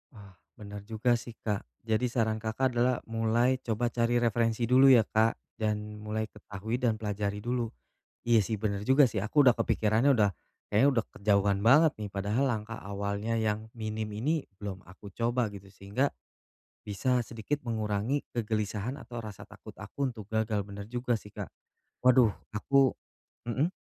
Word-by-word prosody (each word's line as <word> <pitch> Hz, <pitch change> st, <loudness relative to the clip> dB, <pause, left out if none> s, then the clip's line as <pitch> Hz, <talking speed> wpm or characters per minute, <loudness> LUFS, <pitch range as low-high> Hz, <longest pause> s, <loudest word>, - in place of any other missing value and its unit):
Ah, 100 Hz, -2 st, -13 dB, 0.2 s
bener 105 Hz, -2 st, -8 dB
juga 115 Hz, +2 st, +1 dB
sih, 120 Hz, -1 st, -10 dB
Kak. 105 Hz, -3 st, -3 dB, 0.2 s
Jadi, 110 Hz, +2 st, +1 dB
saran 110 Hz, -2 st, 0 dB
Kakak 115 Hz, +4 st, 0 dB
adalah 125 Hz, +1 st, +2 dB
mulai 115 Hz, +3 st, +1 dB
coba 120 Hz, -1 st, -1 dB
cari 120 Hz, +1 st, +1 dB
referensi 115 Hz, 0 st, +1 dB
dulu, 130 Hz, +3 st, +6 dB
ya, 120 Hz, -4 st, +7 dB
Kak? 110 Hz, +2 st, +2 dB, 0.2 s
Dan 105 Hz, 0 st, -2 dB
mulai 110 Hz, +1 st, -3 dB
ketahui, 105 Hz, +3 st, -5 dB
dan 120 Hz, -4 st, +2 dB
pelajari 105 Hz, -1 st, -3 dB
dulu. 120 Hz, 0 st, -1 dB, 0.6 s
Iya, 120 Hz, -1 st, +6 dB
sih, 110 Hz, -, -2 dB
bener 100 Hz, -1 st, -2 dB
juga 135 Hz, +1 st, +6 dB
sih. 110 Hz, -2 st, -3 dB
Aku 145 Hz, +8 st, +3 dB
udah 125 Hz, -3 st, +6 dB
kepikirannya 110 Hz, +6 st, +2 dB
udah 105 Hz, -3 st, +3 dB, 0.4 s
kayaknya 110 Hz, +7 st, +5 dB
udah -, -, -3 dB
kejauhan 100 Hz, -1 st, +2 dB
banget 150 Hz, +7 st, +6 dB
nih. 105 Hz, -1 st, -4 dB
Padahal 100 Hz, +6 st, 0 dB
langkah 110 Hz, -2 st, -3 dB
awalnya 100 Hz, +3 st, -3 dB
yang 110 Hz, 0 st, -1 dB
minim 110 Hz, -1 st, -3 dB
ini 145 Hz, +9 st, -1 dB, 0.2 s
belum 95 Hz, -3 st, -6 dB
aku 100 Hz, +2 st, -12 dB
coba, 120 Hz, 0 st, +1 dB
gitu. 100 Hz, -1 st, -11 dB
Sehingga, 100 Hz, +9 st, -1 dB, 0.7 s
bisa 125 Hz, +5 st, 0 dB
sedikit 120 Hz, +7 st, -4 dB
mengurangi 110 Hz, +3 st, -1 dB
kegelisahan, 110 Hz, +1 st, -2 dB
atau 120 Hz, -1 st, -7 dB
rasa 105 Hz, -3 st, -9 dB
takut -, -, -13 dB
aku 140 Hz, -2 st, -3 dB
untuk 110 Hz, -4 st, -10 dB
gagal. 110 Hz, -2 st, 0 dB
Bener 100 Hz, 0 st, -8 dB
juga 120 Hz, 0 st, -1 dB
sih, 105 Hz, -, -14 dB
Kak. -, -, -6 dB, 0.6 s
Waduh, 125 Hz, -3 st, +6 dB, 0.2 s
aku 135 Hz, +5 st, +3 dB, 0.5 s
mhm? 140 Hz, +9 st, +1 dB
110 Hz, 160 wpm, -29 LUFS, 105-120 Hz, 0.7 s, ya